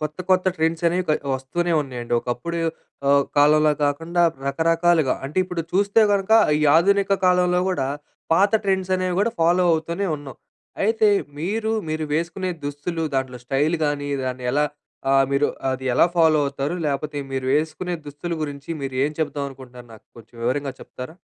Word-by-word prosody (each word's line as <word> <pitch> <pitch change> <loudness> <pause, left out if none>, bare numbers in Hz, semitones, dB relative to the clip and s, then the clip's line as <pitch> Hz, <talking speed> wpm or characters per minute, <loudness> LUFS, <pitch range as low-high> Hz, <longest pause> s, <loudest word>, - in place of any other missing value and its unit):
కొత్త, 155 +1 -5
కొత్త 185 0 +3
ట్రెండ్స్ 160 +1 0
అనేవి 180 +2 +1
క - - +3 0.2
వస్తూనే 170 +7 -2
ఉన్నాయండి. 125 -4 -7
ఒకప్పుడు 125 +9 -3 0.5
ఆహ్, 140 0 +5 0.2
కాలంలా 150 +1 +5
కాకుండా 165 +5 0 0.2
రకరకాలుగా 165 0 +2
అంటే, 150 +6 -3
ఇప్పుడు 180 -2 -4
చూస్తే 200 +3 +3
గనుక 200 +1 +1 0.3
ఈ - - 0
ఆధునిక 195 +3 +3
కాలంలో 180 0 +3
గూడా 135 -8 -1 0.5
పాత 200 +4 +3
ట్రెండ్స్ 190 -1 0
అనేవి 185 -1 -1
గూడా 230 +3 +1
ఫాలో 175 +2 +3
అవుతూనే 170 +5 -1
ఉన్నాం. 145 -2 -10 0.5
అయితే 220 0 +3 0.3
మీరు, 215 +7 -2 0.2
మీరు 155 0 -2
వేసుకునే 175 +3 -2
దుస్తులు 145 +4 -3
దాంట్లో 130 -2 -2
స్టైల్ 145 +6 +1
గానీ 145 -1 -2
దాన్ని 125 -1 -4
ఎలా 150 +1 +2 0.5
ఆహ్, 135 0 +5
మీరు 140 +1 +3 0.3
అది 130 0 -5
ఎలా - - +5
ఫాలో 160 -2 +5
అవుతారు 140 +3 -3
లేకపోతే 145 +1 -2
మీరు 130 -1 -2
వేసుకునే 160 +4 -1
దుస్తుల 145 +4 -6
గురించి 145 0 -6
మీరు 135 -1 -4
ఏం 145 - 0
చెప్దాం 145 -2 -2
అనుకుంటున్నారు 125 -2 -13
నాకు 110 - -18
కొంచెం 115 +1 -17
వివరంగా 135 +3 -1
చెప్తారా? 130 +6 -9
155 Hz, 160 wpm, -22 LUFS, 140-180 Hz, 0.5 s, ఆహ్